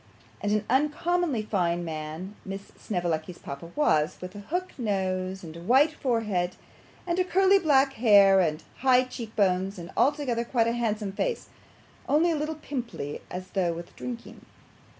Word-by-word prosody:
And 205 - 0
an 210 0 +1
uncommonly 300 0 +1
fine 175 -5 0
man 160 +4 -5
Miss 195 +1 -7
Snevellicci's 175 -3 -2
papa 140 +4 -8
was, 160 - +2
with 180 +1 -7
a 205 - -8
hook 355 - -3
nose, 190 -3 -1
and 160 -1 -9
a 170 - -9
white 265 - +4
forehead, 215 -10 -1 0.5
and 360 +1 +1
curly 385 +1 +5
black 275 -5 +3
hair, 200 -5 +6
and 160 -3 0
high 255 -1 +4
cheek 235 -3 -8
bones, 190 -1 +1
and 175 +1 -8
altogether 270 -4 +1
quite 235 -1 +1
a 230 - +1
handsome 215 -4 -1
face, 475 - -2 0.6
only 325 +4 +4
a - - +1
little 305 +1 -2
pimply 245 - -5
as 185 +1 -6
though 180 -3 +1
with 170 +1 -9
drinking. 240 -2 -7
210 Hz, 155 wpm, -27 LUFS, 180-270 Hz, 0.6 s, hair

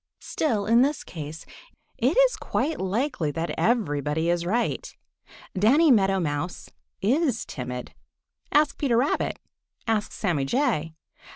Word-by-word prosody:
Still, 220 -10 -1
in 230 +2 +5
this 285 +3 +1
case, 155 -1 -8 0.5
it - - +2
is - - +5
quite 310 +2 -2
likely 205 - -1
that 165 0 -2
everybody 160 - +1
is 175 0 -1
right. 235 +6 -1 0.6
Danny 270 - +4
Meadow 195 -4 +4
Mouse 155 +1 -3 0.3
is 260 - +1
timid. 125 -1 -6 0.6
Ask 295 0 +3
Peter 255 -5 +2
Rabbit. 265 +5 0 0.5
Ask 220 -2 0
Sammy 165 -9 -1
Jay. 165 - 0
205 Hz, 120 wpm, -25 LUFS, 160-260 Hz, 0.6 s, in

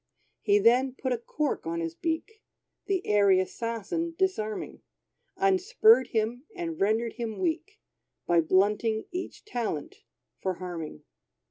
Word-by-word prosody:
He 405 0 +4
then 255 - +4
put 260 -1 -3
a - - 0
cork 290 - -2
on 170 0 -2
his 165 -1 -3
beak, 335 - -3 0.5
The 385 -2 0
airy 200 -2 +5
assassin 230 - -3
disarming, 220 - -2 0.6
Unspurred 390 - +4
him, 230 +4 -1
and 335 -3 -4
rendered 220 +3 +1
him 230 -3 -4
weak, 370 +5 -2 0.5
By 170 -1 +4
blunting 210 +6 +2
each 365 +4 -6
talent 230 - -3 0.4
for 185 -1 -1
harming. 170 - -6
235 Hz, 125 wpm, -28 LUFS, -, 0.6 s, airy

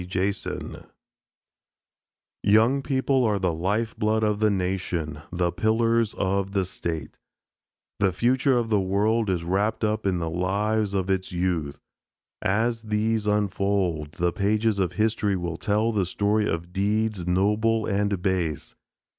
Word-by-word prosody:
JASON 95 +2 -3 1.5
Young 110 +7 +4
people 135 -1 +1
are 105 -3 +2
the 90 -3 0
life 105 +7 -1
blood 110 +1 +1
of 105 -1 +1
the 110 0 +3
nation, 90 -6 -2
the 90 -1 0
pillars 115 +4 +1
of 100 0 -1
the 95 -2 +1
state. 80 -4 -5 0.8
The 95 -2 +3
future 125 +6 +2
of 115 -2 -1
the 105 - +4
world 105 +3 +1
is 90 -3 0
wrapped 100 +6 0
up 110 -1 0
in 95 -2 +1
the 85 -1 -2
lives 100 +5 0
of 95 0 0
its 95 -1 -1
youth. 85 -5 -2 0.6
As 115 +3 0
these 110 0 0
unfold, 100 -6 0
the 85 -1 0
pages 105 +1 +1
of 90 -2 0
history 105 0 +1
will 85 -2 -3
tell 110 +4 +1
the 100 -5 0
story 105 +3 +1
of 85 +2 -4
deeds 105 -1 0
noble 105 +5 +2
and 100 -2 -1
base. 90 -6 -1
100 Hz, 140 wpm, -25 LUFS, 90-110 Hz, 1.5 s, Young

